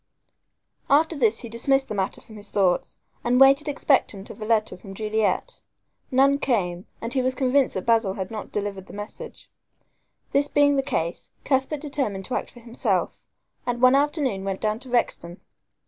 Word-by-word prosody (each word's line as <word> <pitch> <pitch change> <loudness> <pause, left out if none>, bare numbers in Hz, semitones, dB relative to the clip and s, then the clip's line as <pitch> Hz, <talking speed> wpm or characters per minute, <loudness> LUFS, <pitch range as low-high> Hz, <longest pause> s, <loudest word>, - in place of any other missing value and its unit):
After 315 +4 +4
this 225 -6 +2
he 235 - -6
dismissed 270 +4 +1
the - - -4
matter 195 -2 -2
from 220 - -14
his 205 -1 -7
thoughts 185 -3 +1 0.3
and 245 +1 +2
waited 275 +3 +6
expectant 265 -8 +1
of - - -13
a - - -3
letter 220 -1 +1
from 195 +1 -11
Juliet. 220 - -1 0.5
None 275 +1 +4
came, 185 -10 -1
and 230 +1 -4
he 260 - +2
was 255 0 0
convinced 265 0 +2
that 190 - -3
Basil 225 -4 +2
had 190 +1 -5
not 215 -2 -6
delivered 200 -2 -4
the - - -12
message. 210 - -9 0.8
This 285 +1 +3
being 285 0 +3
the 270 - +2
case, 170 - -3
Cuthbert 270 +2 0
determined 265 -11 -2
to 255 - -5
act - - -3
for 240 - -15
himself, 235 +1 -1 0.5
and 240 -1 -1
one 255 +1 +6
afternoon 280 - +1
went 195 -1 -3
down 215 0 0
to 260 0 -11
Rexton. 180 -8 -1
235 Hz, 180 wpm, -24 LUFS, 205-275 Hz, 0.8 s, waited